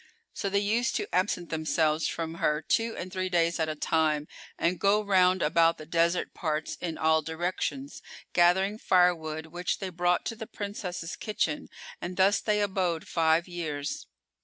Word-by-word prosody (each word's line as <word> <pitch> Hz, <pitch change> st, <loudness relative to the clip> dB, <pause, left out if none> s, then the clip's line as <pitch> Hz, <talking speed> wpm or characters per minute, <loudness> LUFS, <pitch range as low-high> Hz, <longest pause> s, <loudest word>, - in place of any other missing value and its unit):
So 200 Hz, -, -2 dB
they 200 Hz, -, +1 dB
used 220 Hz, +5 st, +1 dB
to 415 Hz, -, -1 dB
absent 180 Hz, -2 st, 0 dB
themselves 155 Hz, 0 st, +1 dB
from 165 Hz, -1 st, -3 dB
her 150 Hz, +1 st, +1 dB
two 225 Hz, 0 st, 0 dB
and 185 Hz, +1 st, -6 dB
three 185 Hz, -1 st, -1 dB
days 170 Hz, -1 st, +1 dB
at 160 Hz, -1 st, 0 dB
a 155 Hz, -, -3 dB
time 155 Hz, -1 st, +1 dB, 0.3 s
and 170 Hz, +1 st, 0 dB
go 205 Hz, +3 st, +3 dB
round 185 Hz, -2 st, +3 dB
about 165 Hz, +2 st, +3 dB
the 155 Hz, -, -9 dB
desert 170 Hz, +2 st, +1 dB
parts 155 Hz, -2 st, -2 dB
in 170 Hz, -2 st, -3 dB
all 160 Hz, 0 st, +3 dB
directions, 180 Hz, -, -3 dB, 0.3 s
gathering 190 Hz, +4 st, +3 dB
firewood, 165 Hz, -5 st, +2 dB
which 175 Hz, +2 st, -3 dB
they 190 Hz, -, -4 dB
brought 175 Hz, 0 st, +1 dB
to 225 Hz, -, -3 dB
the 220 Hz, -1 st, -7 dB
Princess's 190 Hz, -4 st, -5 dB
kitchen; 165 Hz, -8 st, -2 dB, 0.3 s
and 180 Hz, +1 st, -5 dB
thus 195 Hz, +2 st, +4 dB
they 210 Hz, -1 st, +1 dB
abode 185 Hz, -5 st, -1 dB
five[FN#405] 165 Hz, +1 st, +2 dB
years. 155 Hz, -5 st, -4 dB
175 Hz, 165 wpm, -28 LUFS, 160-190 Hz, 0.3 s, thus